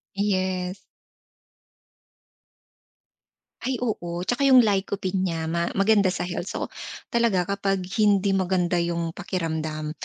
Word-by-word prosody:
Yes. 185 -2 -1 2.8
Ay, 260 +2 -2
oo. 175 -7 -3
Tsaka 245 +8 +1
yung 260 -2 +8
lycopene 195 -2 0
niya 175 -3 -1
ma 170 0 0
maganda 200 0 +4
sa 185 - -1
health. 180 0 -4
So, - - -4 0.4
talaga 230 -6 +2
kapag 195 0 -1 0.2
hindi 200 -2 +4
maganda 180 -2 +1
yung 170 -1 -1
pakiramdam, 160 -4 -3
185 Hz, 110 wpm, -25 LUFS, 175-200 Hz, 2.8 s, yung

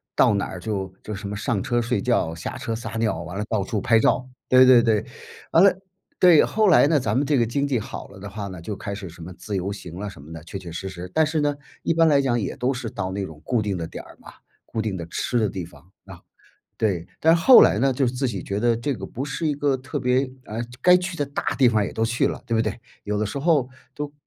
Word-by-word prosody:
到 - - +4
哪 100 - 0
儿 90 - -7
就 95 -1 -3
就 105 - -6
什 100 0 -6
么 105 - -4
上 105 -1 -1
车 120 -1 0
睡 120 +1 -1
觉 120 -9 +1
下 80 - -6
车 115 - -3
撒 115 - -6
尿， 110 -7 0
完 90 +3 -7
了 105 - -2
到 110 -4 0
处 105 +2 -2
拍 115 +3 +3
照， 130 +3 +2 0.2
对 130 0 +7
对 125 -2 +7
对。 110 -3 +1 0.5
完 165 - +6
了 200 - +7 0.5
对， 175 -4 +7
后 215 -1 +2
来 160 - +6
呢， 155 -2 +3
咱 125 - -1
们 140 - +2
这 145 -1 +2
个 120 - +3
经 140 +5 -1
济 130 -5 0
好 - - -7
了 100 - -14
的 100 - -8
话 100 0 -6
呢， 95 -3 -8
就 105 +5 -5
开 100 +1 -5
始 100 -2 -7
什 85 +1 -13
么 90 +3 -8
自 105 +1 -6
由 95 +2 -2
行 90 -3 -8
啊， 105 0 -4
什 95 - -13
么 75 +4 -11
的 80 -2 -9
确 90 - -7
确 90 -3 -9
实 95 +3 -5
实。 90 -1 -8
但 160 - +4
是 155 0 -1
呢， 145 -1 +1 0.3
一 - - +1
般 165 0 +4
来 145 -3 +4
讲 120 -4 +1
也 - - -3
都 130 +2 0
是 120 -2 -5
到 95 -3 -4
那 100 +1 -3
种 75 -2 -12
固 120 -4 +1
定 100 -3 -2
的 80 -1 -4
点 - - -8
儿 - - -16
嘛， - - -13 0.3
固 110 - -3
定 105 -3 -3
的 85 - -5
吃 120 +8 -2
的 110 - +2
地 95 -2 -5
方， 85 - -13 0.2
啊 - - -11 0.6
对。 95 -6 -1
但 165 +1 +5
是 - - -2
后 255 +6 +9
来 100 - +4
呢， 135 +3 +2
就 135 +1 0
是 120 - 0
自 130 +1 -1
己 100 -7 -4
觉 100 +1 -3
得 120 0 +2
这 135 +4 -2
个 95 -4 -7
不 130 +4 -5
是 160 +3 -3
一 150 - +1
个 140 -2 +1
特 130 +2 -5
别 125 +2 +2 0.2
啊， 110 - -7 0.3
该 180 0 +7
去 180 -1 -3
的 145 - 0
大 140 - -5
地 130 -3 +5
方 110 -3 +2
也 - - -5
都 110 - 0
去 120 +2 +1
了， - - -4
对 115 - -6
不 - - +2
对？ 110 0 -2 0.2
有 105 0 -2
的 105 - 0
时 105 - -4
候 145 -4 +2 0.3
都 145 0 -5
115 Hz, 305 characters per minute, -23 LUFS, 95-135 Hz, 0.6 s, 后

